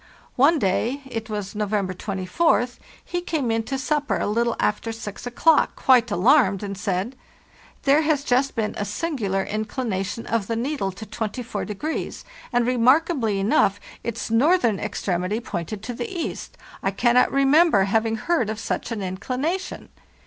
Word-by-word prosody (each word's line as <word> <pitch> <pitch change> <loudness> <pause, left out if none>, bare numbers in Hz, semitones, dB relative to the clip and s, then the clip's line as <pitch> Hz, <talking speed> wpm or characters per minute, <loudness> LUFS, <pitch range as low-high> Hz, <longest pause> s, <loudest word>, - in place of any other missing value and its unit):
One 290 +6 +5
day—it 235 +2 -1
was 205 -1 -4
No 210 -1 -2
vember 200 -3 -1
24th—he 245 - -1
came 295 -9 -1
into 225 +4 -1
supper 295 +1 0
a - - -1
little 235 +3 +1
after 225 +2 0
6 220 0 -7
o'clock 305 +6 +3
quite 245 -2 +4
alarmed 205 - +3
and 200 -1 -4
said, 195 +5 -2 0.3
" - - -27
There 285 +3 +5
has 300 -3 +1
just 270 +1 +1
been 220 -3 -1
a - - 0
singular 205 - -2
inclination 215 -1 -3
of 225 -4 -1
the 230 - -1
needle 240 -4 -1
to 200 +4 -9
24°, 220 +5 -4 0.3
and, 245 -1 +2
remarkably 250 - +3
enough, 195 0 +2 0.2
its 230 -1 -4
northern 240 - +3
extremity 185 +3 -2
pointed 195 -2 -5
to 245 - -4
the 445 - -4
east. 345 -4 -5 0.2
I 195 - +1
cannot 240 +5 +3
re 275 0 +2
member 305 - +5
ever - - +3
having 225 0 +2
heard 245 -1 0
of 220 0 -4
such 225 - -3
an 215 -3 -3
inclination." 255 - -3
230 Hz, 155 wpm, -23 LUFS, 205-275 Hz, 0.3 s, One